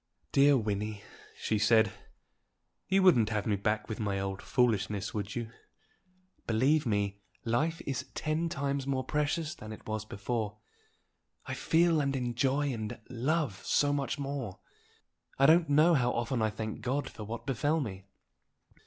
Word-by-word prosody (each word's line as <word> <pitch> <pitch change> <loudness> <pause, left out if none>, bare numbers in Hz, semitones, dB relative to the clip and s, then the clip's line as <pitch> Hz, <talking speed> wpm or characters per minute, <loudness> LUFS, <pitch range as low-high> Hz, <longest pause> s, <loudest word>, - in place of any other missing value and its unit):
"Dear 140 0 +6
Wynnie," 105 -2 -2 0.3
she 110 - 0
said, 110 -1 +4 1.0
"you 190 0 +3
wouldn't 120 - +5
have 105 -2 -1
me 105 - +2
back 105 +1 -1
with 110 - -5
my 100 -3 -1
old 95 0 -3
foolishness, 105 -5 0
would 100 -2 -4
you? 115 -2 -4 1.0
Believe 130 +6 +3
me, 100 -2 -1 0.2
life 155 +9 0
is 135 -3 -3
ten 160 +2 -1
times 140 -2 -2
more 130 -1 0
precious 150 +3 -1
than 110 -10 -9
it 110 - -10
was 110 0 -3
before. 105 0 -3 0.9
I - - -4
feel 165 -1 +3
and 140 -1 0
enjoy 130 +3 0
and 110 -2 -5
love 130 - -1
so 145 0 +2
much 140 +1 -1
more! 135 -8 -4 0.8
I 135 - +5
don't 165 +1 +5
know 155 +4 +5
how 125 -5 +3
often 120 +1 -1
I 110 - +2
thank 110 0 -5
God 130 +2 -1
for 110 - -8
what 110 +3 -6
befell 145 +4 +1
me." 95 -8 -5
120 Hz, 155 wpm, -31 LUFS, 105-145 Hz, 1.0 s, Dear